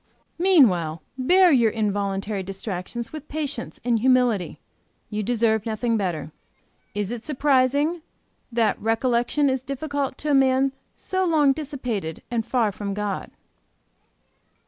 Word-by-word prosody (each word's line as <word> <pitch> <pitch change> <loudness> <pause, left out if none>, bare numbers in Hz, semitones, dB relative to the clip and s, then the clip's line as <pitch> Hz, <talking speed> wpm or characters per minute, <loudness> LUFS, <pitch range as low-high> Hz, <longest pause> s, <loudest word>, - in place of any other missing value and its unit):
Meanwhile 185 - +3
bear 355 +8 +5
your 235 -5 +4
involuntary 205 -1 -1
distractions 195 +5 -5
with 305 -1 -8
patience 290 -5 -4
and 235 -2 +2
humility; 245 -6 +2 0.5
you 210 0 -2
deserve 220 -1 +1
nothing 230 +1 -1
better. 175 -7 -2 0.6
Is 205 0 -2
it 240 -1 -5
surprising 285 +3 +2 0.5
that 230 -3 +1
recollection 240 +5 +1
is 260 -1 0
difficult 275 0 -3
to 300 - -2
a - - +3
man 265 0 +3 0.2
so 375 0 -2
long 305 -6 +4
dissipated 250 - -4
and 235 -2 0
far 230 -2 +1
from 200 0 -5
God? 205 -2 -3
"III. - - -24
240 Hz, 125 wpm, -24 LUFS, 210-275 Hz, 0.6 s, bear